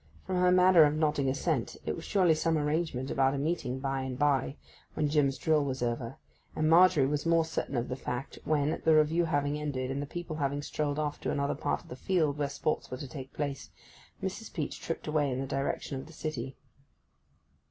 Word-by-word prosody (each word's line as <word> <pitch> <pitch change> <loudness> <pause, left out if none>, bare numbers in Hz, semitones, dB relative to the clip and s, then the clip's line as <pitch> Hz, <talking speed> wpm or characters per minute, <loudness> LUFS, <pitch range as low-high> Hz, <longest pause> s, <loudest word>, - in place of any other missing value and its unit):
From 185 - -1
her 180 0 +4
manner 180 -1 +6
of 145 +1 +1
nodding 150 -3 +1
assent 140 -2 -1
it - - -1
was 165 - -8
surely 185 -5 +4
some 160 +1 +1
arrangement 150 -3 -1
about 135 0 +2
a - - -2
meeting 140 -4 -1
by 135 0 -2
and 130 -1 -4
by 140 -1 +1 0.4
when 150 - +1
Jim's 145 -3 +2
drill 155 -2 +2
was 130 -2 -2
over, 120 +1 -2 0.4
and 155 - +1
Margery 170 -3 +6
was 145 +1 -1
more 165 -1 +3
certain 160 -4 -3
of 120 - -1
the 125 - -3
fact 125 +1 -5
when, 155 +1 0
the 160 -1 +5
Review 155 +3 +3
having 145 -1 0
ended, 135 -3 -3
and 140 +1 -2
the 145 - -5
people 170 0 -5
having 145 -1 -1
strolled 145 -1 -2
off 150 -1 -2
to - - -2
another 140 0 0
part - - -2
of - - -19
the - - -7
field 155 -1 0
where 145 -1 0
sports 155 +2 -2
were 130 - -5
to 140 - -7
take 135 -1 -8
place, 140 -2 -4 0.5
Mrs. - - -4
Peach - - -4
tripped - - -4
away 150 -2 +1
in 125 - -2
the 135 - -2
direction 135 0 -2
of 135 - -9
the 165 - -13
city. 135 -5 -5
145 Hz, 215 wpm, -30 LUFS, 135-160 Hz, 0.5 s, manner